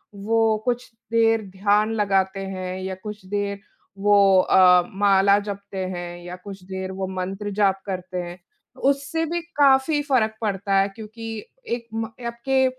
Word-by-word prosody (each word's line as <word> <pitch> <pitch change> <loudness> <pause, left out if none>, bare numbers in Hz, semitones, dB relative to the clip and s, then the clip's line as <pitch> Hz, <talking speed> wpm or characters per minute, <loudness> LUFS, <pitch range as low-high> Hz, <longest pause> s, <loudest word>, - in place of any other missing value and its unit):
वो 220 +2 +2
कुछ 245 0 -2 0.2
देर 225 -1 +3
ध्यान 205 +3 +2
लगाते 195 -2 +1
हैं 185 -1 -5
या 190 0 -3
कुछ 210 -2 -7
देर 200 +1 -2 0.4
वो 205 +1 +4 0.2
अ, 180 -1 +6
माला 200 0 +4
जपते 200 -1 -7
हैं 175 -1 -5
या 175 +1 -6
कुछ 195 -2 -9
देर 190 0 -5
वो 190 0 -4
मंत्र 190 +2 -4
जाप 195 -1 +3
करते 185 -1 -5
हैं। 175 +1 -8 0.5
उससे 285 +4 -2
भी 340 +2 -2 0.2
काफ़ी 280 +2 +4
फ़र्क 230 -6 +1
पड़ता 200 -2 -1
है 195 - +3
क्योंकि 220 +2 -9 0.4
एक 235 -1 -3
म 225 0 -2 0.2
आपके 260 +3 +1
200 Hz, 150 wpm, -23 LUFS, 190-225 Hz, 0.5 s, अ